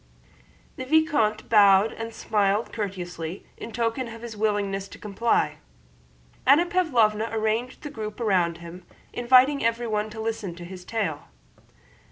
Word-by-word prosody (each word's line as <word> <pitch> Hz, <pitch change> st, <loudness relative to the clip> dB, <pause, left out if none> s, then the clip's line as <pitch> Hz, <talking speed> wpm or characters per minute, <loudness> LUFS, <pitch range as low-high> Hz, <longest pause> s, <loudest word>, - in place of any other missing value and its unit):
The 260 Hz, -, -5 dB
vicomte 285 Hz, -8 st, +2 dB
bowed 205 Hz, -1 st, +5 dB
and 225 Hz, 0 st, -6 dB
smiled 210 Hz, -1 st, 0 dB
courteously 180 Hz, -4 st, -5 dB
in 230 Hz, -, -8 dB
token 235 Hz, +2 st, -1 dB
of 230 Hz, 0 st, -10 dB
his 235 Hz, -2 st, -7 dB
willingness 205 Hz, -2 st, -1 dB
to -, -, -12 dB
comply. 215 Hz, +3 st, 0 dB, 0.9 s
Anna 295 Hz, +6 st, +5 dB
Pávlovna 235 Hz, -12 st, +1 dB
arranged 225 Hz, +5 st, -2 dB
a 295 Hz, -, -5 dB
group 215 Hz, -4 st, -6 dB
round 180 Hz, -7 st, +1 dB
him, 170 Hz, +1 st, -10 dB, 0.3 s
inviting 255 Hz, +3 st, +4 dB
everyone 230 Hz, -2 st, 0 dB
to 220 Hz, +1 st, -9 dB
listen 220 Hz, -5 st, -3 dB
to 175 Hz, 0 st, -9 dB
his 180 Hz, 0 st, -9 dB
tale. 190 Hz, -10 st, -3 dB
220 Hz, 135 wpm, -25 LUFS, 195-235 Hz, 0.9 s, bowed